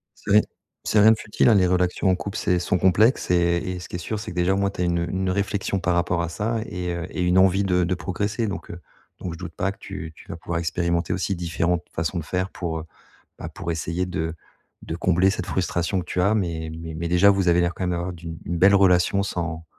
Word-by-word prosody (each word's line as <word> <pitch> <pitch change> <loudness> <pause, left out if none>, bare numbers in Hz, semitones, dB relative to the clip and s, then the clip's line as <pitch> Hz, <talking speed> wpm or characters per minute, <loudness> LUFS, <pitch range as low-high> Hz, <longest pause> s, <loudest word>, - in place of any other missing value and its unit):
C'est - - -6
rien 105 +1 +7 0.4
c'est 105 - +3
rien 110 +1 +8
de 110 - +3
futile, 105 +2 +2
hein, 110 - +6
les 90 -2 +4
relations 90 +1 +1
en 90 - +4
couple, 100 +2 -5
c'est 90 - +1
sont 90 +1 0
complexes 105 +6 +3
et 85 -1 +3
et 90 +1 -4
ce - - -10
qui 90 - -4
est - - -8
sûr, 110 +5 -3
c'est 105 -2 -6
que, - - -10
déjà, 90 +2 +2
au - - 0
moins, 100 0 +1
tu 90 - -5
as - - +2
une 85 0 0
une 95 +1 -1
réflexion 100 0 -1
par 90 -1 0
rapport 85 0 +1
à 85 - -2
ça 110 +6 -2
et, 90 -1 -3
heu, 85 0 -4
et 90 - -4
une 90 +1 +2
envie 95 +1 +4
de 90 -2 +2
de 90 +2 0
progresser. 100 +5 -2
Donc, 100 - -5
heu, 85 - -8 0.4
donc 90 -2 -5
je - - -9
doute 85 -3 -8
pas 95 +1 0
que - - -23
tu 90 -5 -8
tu - - -16
vas 85 - -5
pouvoir 85 0 -4
expérimenter 85 +1 -1
aussi 95 +1 -1
différentes 85 0 -1
façons 80 +2 -2
de 80 - -2
faire 95 +3 -2
pour, 80 -3 -4
heu, - - -6 0.6
bah, - - -6
pour 85 - -5
essayer 85 +2 -2
de 85 -3 -3 0.5
de 80 - -5
combler 90 +2 +3
cette 100 - -3
frustration 90 0 -1
que 90 - -5
tu 90 - -1
as. 100 +4 +3
Mais 80 -5 -2
mais 80 -1 -7
mais 85 +1 -3
déjà, 90 +3 +5
vous 95 -3 +3
avez 85 +1 +4
l'air, 85 0 0
quand 95 - -4
même, 90 - 0
d'avoir 85 +1 -2
d'une 85 -1 -8
une 85 +1 -2
belle 95 +3 +6
relation 95 0 +4
sans 85 -4 -4
90 Hz, 265 wpm, -24 LUFS, 85-95 Hz, 0.6 s, rien